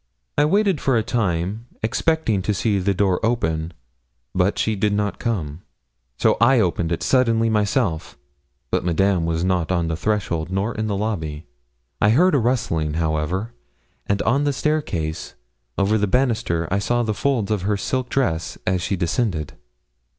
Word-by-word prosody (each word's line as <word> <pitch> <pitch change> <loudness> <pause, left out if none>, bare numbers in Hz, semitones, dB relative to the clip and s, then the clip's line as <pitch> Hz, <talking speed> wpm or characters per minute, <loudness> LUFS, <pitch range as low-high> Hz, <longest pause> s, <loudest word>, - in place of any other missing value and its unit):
I 145 - +4
waited 195 0 +2
for 135 -3 +2
a 110 - +1
time, 105 -1 -1 0.2
expecting 115 -2 +1
to 105 +2 -1
see 100 0 +1
the 100 +1 0
door 95 0 +1
open, 85 -9 0 0.6
but 95 +2 +1
she 110 - 0
did 105 +1 +1
not 105 0 -1
come; 85 - -3 0.6
so - - +3
I 125 +2 +5
opened 85 -4 0
it 85 - -1
suddenly 115 -3 +3
myself, 105 - 0 0.5
but - - +1
Madame 90 0 +1
was 80 0 -1
not 90 -2 0
on 85 -2 0
the 80 - -1
threshold 85 -4 -1
nor 100 +5 -1
on 110 -1 -2
the 100 -2 -1
lobby. 80 -8 -3 0.6
I 105 - +5
heard 170 +11 +4
a 140 - +4
rustling, 85 -11 0
however, 80 +7 -1 0.5
and 100 0 0
on 140 +5 +2
the 145 -1 +1
staircase 110 - -2 0.4
over 105 +3 +2
the 105 - +1
banister 110 -8 +1
I 100 - +2
saw 120 +4 0
the 110 -2 -1
folds 115 -3 0
of 105 -3 0
her 100 +2 0
silk 130 +4 -2
dress 85 -12 -1
as 90 -1 +1
she 100 - -1
descended. 85 - -1
100 Hz, 165 wpm, -22 LUFS, 85-115 Hz, 0.6 s, I